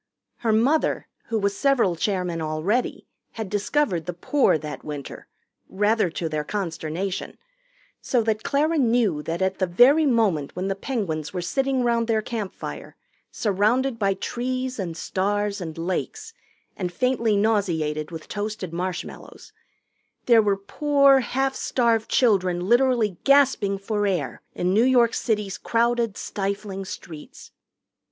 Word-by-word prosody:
Her 230 - 0
mother, 255 +9 +2 0.2
who 230 - -1
was 200 -1 0
several 250 -10 +2
chairmen 180 -2 -1
already, 160 +10 -1 0.3
had 220 -4 -6
discovered 205 - 0
the 180 - -4
Poor 260 - +2
that 150 -2 -7
winter 145 -2 -7 0.4
rather 210 0 +2
to 165 0 -3
their 155 -1 -2
consternation 180 +1 -4 0.6
so 245 -3 +1
that 215 -1 0
Clara 305 +6 +1
knew 230 - +2
that 165 +4 -2
at 190 0 -1
the 185 - +1
very 265 - +5
moment 205 - +1
when 185 +2 -2
the 195 - -1
Penguins 190 - -3
were 180 - -1
sitting 270 +5 0
round 235 -1 +1
their 220 -2 +1
campfire, 215 -5 -6 0.4
surrounded 230 +5 +1
by 195 -2 +1
trees 255 +4 -3
and 170 -4 -4
stars 205 +2 -1
and 160 -2 -6
lakes, 185 - -4 0.4
and 180 -2 -3
faintly 230 +1 +1
nauseated 170 -8 0
with 165 -2 -8
toasted 205 -4 -4
marshmallows, 180 +1 -6 0.7
there 235 -2 +6
were 200 -2 +1
poor, 280 +6 +3
half 270 +1 -1
starved 230 -4 0
children 185 -7 +2
literally 240 -5 +2
gasping 270 -8 +3
for 205 +1 -1
air 150 -11 -2
in 180 +1 0
New 220 +4 +4
York 245 -2 +4
City's 210 -4 -1
crowded, 235 -2 0
stifling 195 -1 -4
streets. 160 -4 -10
205 Hz, 135 wpm, -24 LUFS, 180-240 Hz, 0.7 s, there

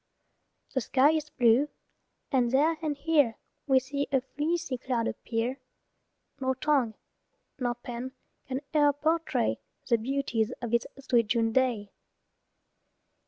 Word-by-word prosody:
The 260 - +1
sky 270 +5 +4
is 310 -1 -1
blue, 245 +4 +3 0.6
and 250 -3 +3
there 295 +6 +3
and 300 -3 -2
here 285 -6 +2 0.3
We 265 -2 +5
see 280 +2 -3
a 265 -2 +3
fleecy 295 0 -2
cloud 240 -3 -1
appear; 235 +4 -2 0.8
Nor 260 -1 0
tongue 260 -5 +1 0.6
nor 245 -2 0
pen 240 +2 -6 0.3
can 260 +1 -3
e'er 290 -2 +5
portray 310 - 0 0.3
The 235 - +3
beauties 245 -2 -1
of 240 -2 -4
this 235 0 +2
sweet 240 -4 +2
June 225 0 +2
day. 230 -5 +1
260 Hz, 125 wpm, -29 LUFS, 235-285 Hz, 0.8 s, We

